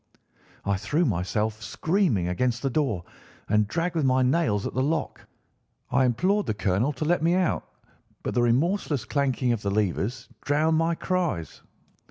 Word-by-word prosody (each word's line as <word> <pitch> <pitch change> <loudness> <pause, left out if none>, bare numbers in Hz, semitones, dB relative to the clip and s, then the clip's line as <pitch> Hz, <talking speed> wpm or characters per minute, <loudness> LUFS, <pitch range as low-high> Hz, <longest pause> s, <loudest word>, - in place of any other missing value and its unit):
I 100 -1 +1
threw 150 - 0
myself, 105 - -1
screaming, 155 - 0
against 120 +7 -1
the 135 - 0
door, 125 - 0 0.4
and 105 0 +2
dragged 165 - -1
with 160 -3 0
my 130 -1 +3
nails 125 -7 +1
at - - -3
the 130 - 0
lock. 150 +3 -2 0.6
I 130 0 +4
implored 185 - +1
the 110 - -1
colonel 100 +7 +1
to 155 - -3
let 175 0 +2
me 170 +2 +3
out, 185 -2 0 0.6
but - - -2
the 120 - +2
remorseless 145 - +1
clanking 135 -3 0
of 115 -3 -1
the 100 - -1
levers 105 +4 -1 0.2
drowned 155 +3 +2
my 165 +1 +1
cries. 170 - -2
130 Hz, 165 wpm, -26 LUFS, 110-160 Hz, 0.6 s, I